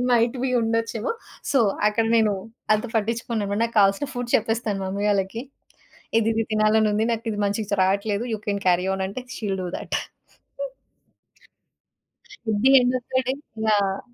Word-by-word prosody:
Might 235 +1 +3
be 265 - +1
ఉండొచ్చేమో! 230 0 -1 0.4
So, 275 - +4 0.3
అక్కడ 215 +2 +2
నేను 220 -2 +4 0.4
అంత 215 +2 -1
పట్టించుకోను. 220 -2 -1
నాకు 230 0 -1
కావాల్సిన 195 +7 +4
ఫుడ్ 245 -1 -4
చెప్పేస్తాను 220 -2 -1
మమ్మీ 200 +2 -2
వాళ్ళకి. 200 +3 -1 0.8
ఇదిది 225 0 +1
తినాలనుంది 215 0 +3
నాకు 230 0 -3
ఇది 205 - -5
మంచిగా 205 +1 -1
స్ - - +5
రాట్లేదు 200 +3 +1
యూ 220 - -1
కెన్ 200 -1 -1
క్యారి 180 0 +3
ఆన్ 190 0 -2
అంటే 225 +6 -6
షి - - -10
will 195 - -1
do 180 - -3
that. - - -3 2.5
Could 215 -2 0
be 270 - +7
end 250 +1 +1
of 245 - -38
the 260 - +3
day 260 - +1 0.3
yeah! 200 -2 +2
215 Hz, 155 wpm, -24 LUFS, 200-230 Hz, 2.5 s, be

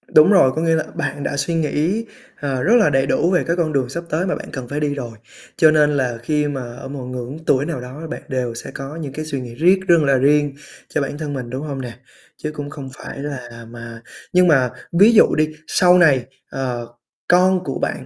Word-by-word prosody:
Đúng 155 +6 +8
rồi, 185 -10 +6
có 160 - -1
nghĩa 165 0 +2
là 160 - 0
bạn 145 0 -3
đã 145 - -2
suy 140 +4 -1
nghĩ, 165 +7 0 0.3
ờ, 135 -3 -2
rất 220 +7 +4
là 225 -8 +5
đầy 135 -1 +2
đủ 170 +5 +2
về 180 - +2
cái 170 - 0
con 165 -3 -1
đường 130 -3 0
sắp 170 +6 -5
tới 165 +4 0
mà 185 - -1
bạn - - -8
cần 130 -4 -6
phải 145 +4 -3
đi 150 -1 0
rồi, 125 -4 -5 0.5
cho 155 -1 +6
nên 150 -1 +4
là 130 -5 -1
khi 150 +2 0
mà 140 -2 -3
ở 135 - -8
một 135 -2 -6
ngưỡng 125 +2 -6
tuổi 135 +1 +2
nào 150 -6 -4
đó 135 +6 -8
bạn 160 - -6
đều 125 -4 -2
sẽ - - -7
có 135 +2 -7
những 150 -5 -6
cái 155 +2 -5
suy 140 -4 -4
nghĩ 120 -2 -8
riết 180 +7 +4
rương 170 -3 +5
là 135 -1 +3
riêng 145 +1 +3 0.4
cho - - -1
bản 140 +1 -3
thân 150 -2 -4
mình, 125 -3 -5
đúng 130 +3 -4
hông 135 -2 -4
nè? 120 -2 -6 0.4
Chứ 155 - -4
cũng 145 -1 -6
không 140 -3 -8
phải - - -8
là 125 -5 -7
mà 115 -1 -9 0.3
nhưng 180 0 +5
mà 135 -6 +4 0.3
ví 215 +4 +7
dụ 215 - +5
đi, 155 0 +2 0.2
sau 180 0 +5
này, 140 -8 +4 0.2
ờ, 125 -3 -4 0.4
con 185 +1 +4
của 135 - -4
bạn, - - -3
145 Hz, 245 wpm, -20 LUFS, 130-160 Hz, 0.5 s, Đúng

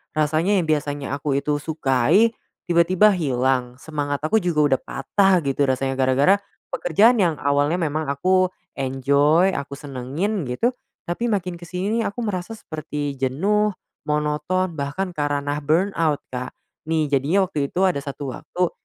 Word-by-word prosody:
Rasanya 155 +6 +2
yang 165 - -2
biasanya 145 -2 -1
aku 140 -1 -2
itu 145 0 -1
sukai 160 - +3 0.4
tiba-tiba 175 +4 +4
hilang, 130 -5 0
semangat 145 -2 -3
aku 220 +8 +3
juga 150 -5 +3
udah - - -5
patah 190 +7 +2
gitu 140 +1 0
rasanya 135 0 0
gara-gara 135 +7 +4 0.4
pekerjaan 220 +8 +3
yang 165 -3 +1
awalnya 145 +3 +2
memang 155 -2 -1
aku 185 +6 +2 0.3
enjoy, 140 +6 +3
aku 140 0 -4
senengin 145 +8 -3
gitu, 175 - 0 0.4
tapi 230 +8 -1
makin 180 -4 -1
kesini 185 +6 -2
nih - - +1
aku 245 - -9
merasa 185 -1 -3
seperti 150 -6 -5
jenuh, 200 +11 +1 0.4
monoton, 150 +5 0
bahkan 145 +7 -3
ker 145 -1 -1
anah 145 +1 -2
burnout, 160 -1 +1
Kak, 125 0 -4 0.4
nih 155 -2 0
jadinya 145 +8 +2
waktu 145 -6 -2
itu - - -3
ada 175 -6 0
satu 140 -1 -5
waktu 180 -1 -2
150 Hz, 145 wpm, -22 LUFS, 140-180 Hz, 0.4 s, tiba-tiba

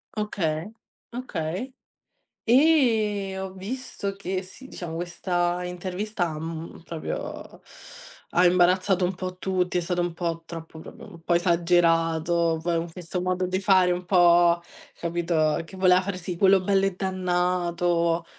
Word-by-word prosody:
Okay, 175 -7 -2 0.4
okay. 235 -2 -4 0.7
E 225 -8 +3
ho 190 0 -5
visto 200 0 -5
che 190 -1 -3
sì 260 +8 -12
diciamo 170 -9 -7
questa 175 +1 -1
intervista, 180 -1 -3
mhmm, 165 +1 -7
proprio 165 -2 -6 0.7
ha 175 +1 +4
imbarazzato 180 +1 +3
un 180 +1 +1
po' 185 0 -6
tutti 185 -1 -1
è 175 - +1
stato 175 +1 -2
un 175 -1 -1
po' 165 -1 -3
troppo 165 -1 -9
proprio - - -11
un 170 -4 -14
po' 175 - +1
esagerato. 170 -1 +2
Poi 170 0 0
con 165 0 -4
questo 180 +1 -5
modo 185 0 0
di 185 +1 -1
fare 185 -2 +4
un 180 +1 -2
po', 175 -1 +5 0.4
capito 170 -2 0
che 190 - -12
voleva 185 -1 +5
fare 190 0 -4
sì, 180 0 -5
quello 195 +2 +5
bello 195 +1 +2
e 195 -2 -1
dannato. 175 -2 0
180 Hz, 140 wpm, -25 LUFS, 170-190 Hz, 0.7 s, po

